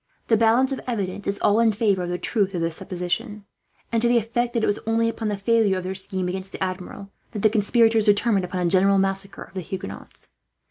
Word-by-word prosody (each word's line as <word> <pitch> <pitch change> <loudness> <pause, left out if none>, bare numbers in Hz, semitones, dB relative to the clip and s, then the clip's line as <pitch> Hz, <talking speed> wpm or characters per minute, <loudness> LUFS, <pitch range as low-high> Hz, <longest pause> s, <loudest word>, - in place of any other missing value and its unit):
The 225 - +5
balance 230 +4 +3
of 270 - -3
evidence 205 -4 -3
is 200 0 -1
all 210 +2 +4
in 230 -1 +4
favour 205 -3 +1
of 175 - -3
the 175 - -2
truth 200 -1 -1
of 170 - -1
this 165 -1 -1
supposition, 205 +4 -4 0.5
and 230 -1 +1
to 240 - +4
the 240 0 +4
effect 235 +2 -1
that 230 - 0
it - - +4
was 205 - 0
only 225 0 +2
upon 230 -1 -3
the 205 -1 -1
failure 210 -1 +2
of 185 - -4
their 185 +1 -3
scheme, 190 -1 -3
against 190 +1 -4
the - - -4
Admiral, 185 +1 -6 0.2
that 210 - -4
the 215 - +5
conspirators 225 0 +3
determined 205 -1 +3
upon 180 0 -2
a 170 - +1
general 195 +1 +4
massacre 195 0 -1
of - - -18
the 190 - -4
Huguenots. 185 +2 -8
205 Hz, 235 wpm, -23 LUFS, 190-225 Hz, 0.5 s, The